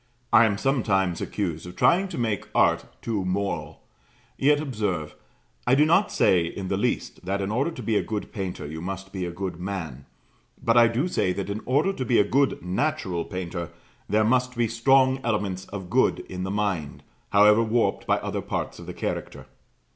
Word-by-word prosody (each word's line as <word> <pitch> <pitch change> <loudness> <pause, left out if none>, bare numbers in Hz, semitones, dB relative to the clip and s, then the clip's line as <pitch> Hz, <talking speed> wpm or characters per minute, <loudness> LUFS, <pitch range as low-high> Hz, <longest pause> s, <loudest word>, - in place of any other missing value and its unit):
'" 120 - -24
I 115 - +8
am 105 -2 +1
sometimes 100 -9 +1
accused 85 -5 -3
of 90 - -9
trying 190 +3 +3
to - - -7
make 110 -5 -1
art - - +3 0.2
too 110 -4 -1
moral; 100 +2 -3 0.5
yet, 145 +2 +3
observe, 105 - -2 0.5
I 125 - +5
do 150 +2 +5
not 170 +6 +3
say 90 -2 +3
in 95 +2 -5
the - - +1
least - - -2
that 95 +2 -1
in 100 +1 -2
order 130 +8 +1
to 130 -7 -8
be 110 +1 0
a - - +3
good 105 -2 -5
painter 95 -6 -4
you 80 +2 -6
must 95 +1 -6
be 95 -2 -3
a - - -4
good 90 -1 -5
man; 85 -8 -5 0.5
but 115 - +1
I 120 -1 +7
do 120 +9 0
say 90 - 0
that 100 +1 -4
in 105 +2 -4
order 150 +10 +2
to 130 - -3
be 120 -1 +2
a - - +6
good 135 +1 +1
natural 90 - -1
painter 90 -3 -5 0.4
there 110 +2 +3
must 125 +1 +1
be 120 -1 +2
strong 130 +3 +3
elements 100 -5 -1
of 95 -3 -8
good - - +3
in 90 0 -7
the - - -3
mind, 95 -8 -2 0.3
however 105 +2 +6
warped 115 +1 0
by - - +3
other - - -3
parts - - -4
of - - -10
the - - -7
character. - - -4
105 Hz, 200 wpm, -25 LUFS, 95-120 Hz, 0.5 s, I